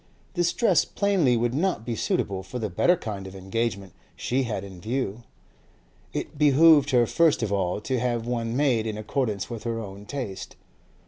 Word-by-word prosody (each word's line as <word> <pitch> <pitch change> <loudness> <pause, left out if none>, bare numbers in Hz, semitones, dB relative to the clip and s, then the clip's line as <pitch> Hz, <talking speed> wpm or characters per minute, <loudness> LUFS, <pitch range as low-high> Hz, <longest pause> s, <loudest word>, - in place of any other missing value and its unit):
This 175 -2 +1
dress 190 -10 +3
plainly 185 - +2
would 120 +1 0
not 160 - 0
be 120 - -2
suitable 95 -2 -1
for 95 +6 -7
the 110 -5 -3
better 175 - +3
kind 100 -7 -6
of 95 - -10
engagement 100 -1 -3 0.2
she 130 +1 -1
had 105 -5 -3
in 95 -3 -10
view; 115 0 -2 0.9
it 145 - -5
behoved 150 0 +6
her 125 -3 +4
first 160 0 +3
of 105 -2 -1
all 95 -1 0
to 130 +3 -1
have 120 -1 -1
one 120 -1 -2
made 125 -6 +2
in 110 -1 -3
accordance 110 -2 -2
with 115 -3 -7
her 115 -1 -2
own 100 -1 -8
taste. 120 -10 -5
115 Hz, 180 wpm, -26 LUFS, 100-140 Hz, 0.9 s, behoved